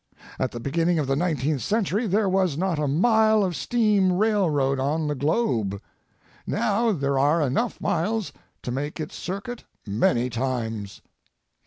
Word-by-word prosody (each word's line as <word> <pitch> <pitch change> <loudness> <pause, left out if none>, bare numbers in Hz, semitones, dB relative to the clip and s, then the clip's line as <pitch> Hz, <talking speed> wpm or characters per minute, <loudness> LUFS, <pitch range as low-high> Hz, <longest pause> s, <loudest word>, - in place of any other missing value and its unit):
At 130 - 0
the 120 - -7
beginning 165 +7 0
of 150 - 0
the 135 +1 0
nineteenth 150 -4 0
century 215 +1 0
there 205 +2 +2
was 185 -5 +1
not 180 -2 0
a 150 - 0
mile 220 - +3
of 180 -3 -1
steam 210 -5 +2
railroad 180 -10 +1
on 150 +4 0
the 150 - 0
globe. 130 - 0 0.7
Now 225 +1 +1
there 140 -6 0
are 145 +5 +3
enough 150 - 0
miles 200 +3 -1 0.3
to 125 - -4
make 145 +5 -4
its 155 - -5
circuit 200 +6 -5 0.2
many 120 +4 +1
times. 115 -5 -3
160 Hz, 150 wpm, -24 LUFS, 135-205 Hz, 0.7 s, mile